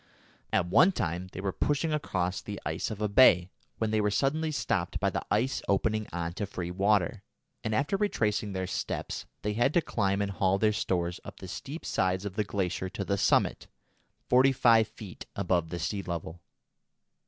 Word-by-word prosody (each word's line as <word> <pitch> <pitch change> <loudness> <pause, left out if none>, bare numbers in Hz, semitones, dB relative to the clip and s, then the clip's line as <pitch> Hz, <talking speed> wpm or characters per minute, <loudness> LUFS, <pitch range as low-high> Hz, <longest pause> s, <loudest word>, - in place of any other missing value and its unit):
At - - +2
one 115 - +5
time 90 - -2
they 95 - -6
were 100 -1 -1
pushing 150 - 0
across 95 -11 -1
the - - -6
ice - - -2
of 110 -1 -4
a - - +2
bay, 95 -5 +6 0.3
when 110 -1 -1
they 110 -1 +2
were 105 - +2
suddenly 145 +9 0
stopped 100 - -1
by - - +1
the - - -2
ice 120 +6 +1
opening 110 +2 +1
on 85 -1 -3
to 100 +2 -3
free 90 -3 -5
water, 100 +1 +1 0.4
and, 110 0 -1
after 145 - +1
retracing 105 - 0
their 95 -1 -2
steps, 95 - -4 0.2
they 105 - 0
had 120 +6 +1
to 175 - +5
climb 100 -2 0
and 100 -1 -1
haul 95 0 +2
their 110 +1 +2
stores 90 -4 -1
up - - -10
the 95 - -8
steep 140 - -7
sides 95 +1 0
of 100 - -4
the 105 - +1
glacier 95 -2 -2
to 100 - -5
the 100 - +1
summit, 100 - +2 0.6
forty 130 +2 +5
five 115 -4 +5
feet 100 -6 -10
above 90 -4 0
the 90 - -4
sea 100 +4 -2
level. 85 -2 -5
100 Hz, 190 wpm, -29 LUFS, 90-115 Hz, 0.6 s, bay